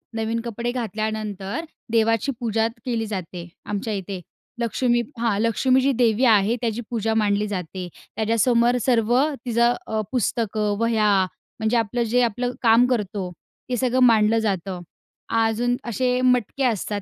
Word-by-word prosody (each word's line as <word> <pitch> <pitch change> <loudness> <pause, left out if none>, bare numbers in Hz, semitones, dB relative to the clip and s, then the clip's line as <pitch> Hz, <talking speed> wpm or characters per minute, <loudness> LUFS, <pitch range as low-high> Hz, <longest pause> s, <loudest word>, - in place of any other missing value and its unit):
नवीन 225 +1 -1
कपडे 235 +1 -3
घातल्यानंतर 215 - -3 0.3
देवाची 225 +3 +2
पूजात 225 -1 0 0.2
केली 230 -3 -1
जाते 180 -4 -6 0.2
आमच्या 210 +2 -3
इथे. 195 -1 -4 0.4
लक्ष्मी 240 +1 +1 0.2
हां, 230 -4 +1
लक्ष्मी 255 +4 +2
जी 275 +2 +2
देवी 240 0 +3
आहे 220 -1 +4
त्याची 230 -1 -1
पूजा 225 -2 -1
मांडली 210 -1 +1
जाते. 185 -2 -5 0.3
त्याच्यासमोर 235 +3 +2
सर्व 235 -2 +2 0.3
तिचं 235 0 +2
अ, 220 0 -1
पुस्तकं, 215 -4 0
वह्या 225 -2 +2 0.5
म्हणजे 220 +2 +1
आपलं 230 +2 0
जे 240 +2 +2
आपलं 245 +2 -1
काम 235 0 +5
करतो, 205 -6 -2 0.4
ते 250 - 0
सगळं 255 +1 +1
मांडलं 225 -2 +5
जातं. 190 -4 -2 0.6
अजून 225 +2 +1
असे 250 +2 0
मटके 250 +1 +1
असतात 210 -3 -1
225 Hz, 140 wpm, -23 LUFS, 210-240 Hz, 0.6 s, काम